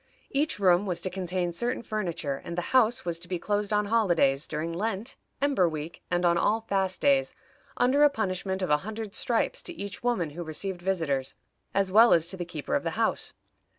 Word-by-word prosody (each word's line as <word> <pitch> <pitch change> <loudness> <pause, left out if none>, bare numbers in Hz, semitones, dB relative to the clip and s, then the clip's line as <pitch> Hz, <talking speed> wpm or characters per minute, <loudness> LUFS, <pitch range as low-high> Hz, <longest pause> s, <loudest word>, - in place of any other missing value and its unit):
Each 290 +3 0
room 190 0 +3
was 180 -2 0
to 185 - -3
contain 180 -1 -2
certain 240 +6 -2
furniture, 170 -10 -2
and 170 - -6
the - - +1
house 250 0 +4
was 170 -1 -1
to 175 - -9
be 180 0 -2
closed 205 +3 -1
on 210 0 +2
holidays, 175 -10 +2
during 160 +2 -3
Lent, 210 +5 -3 0.2
Ember 270 -11 +2
Week, 155 +1 -6
and 175 0 +1
on 170 0 +3
all 220 +5 +2
fast 195 -3 -1
days, 275 -1 +3 0.4
under 255 +4 +3
a 295 - +7
punishment 190 -5 -2
of 180 - -1
a 150 - +6
hundred 215 +4 -6
stripes 235 -2 0
to 350 - -6
each 200 - -7
woman 215 -11 0
who 170 +4 -7
received 175 +3 -4
visitors, 165 -8 -1 0.4
as 195 -1 +1
well 225 +4 +7
as 165 -1 +4
to 190 - -2
the 175 -2 -4
keeper 155 -4 -5
of - - +2
the - - -2
house. - - 0
190 Hz, 205 wpm, -28 LUFS, 170-220 Hz, 0.4 s, a